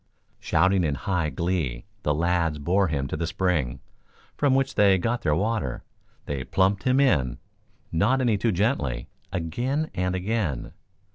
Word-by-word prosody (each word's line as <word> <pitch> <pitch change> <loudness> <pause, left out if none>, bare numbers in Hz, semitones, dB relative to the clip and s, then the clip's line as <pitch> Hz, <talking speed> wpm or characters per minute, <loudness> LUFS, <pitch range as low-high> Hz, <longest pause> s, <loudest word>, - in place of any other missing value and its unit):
Shouting 95 0 +2
in 75 -3 0
high 90 0 -1
glee 80 -9 -2 0.2
the 75 - 0
lads 85 -1 +1
bore 90 +6 +2
him 70 -4 -1
to - - -3
the 80 +1 -2
spring 80 -8 -1 0.5
from 140 -2 +2
which 135 0 +1
they 100 -2 +5
got 115 +6 -1
their 75 - +1
water. 95 - -1 0.4
They 70 -3 -3
plumped 95 +5 +1
him 130 +1 +3
in, 75 - +2 0.5
not 125 +11 +2
any 120 -4 +2
too 115 - +2
gently, 85 - -1 0.2
again 125 - -2
and 90 0 -1
again. 95 - -2
90 Hz, 150 wpm, -25 LUFS, 75-110 Hz, 0.5 s, they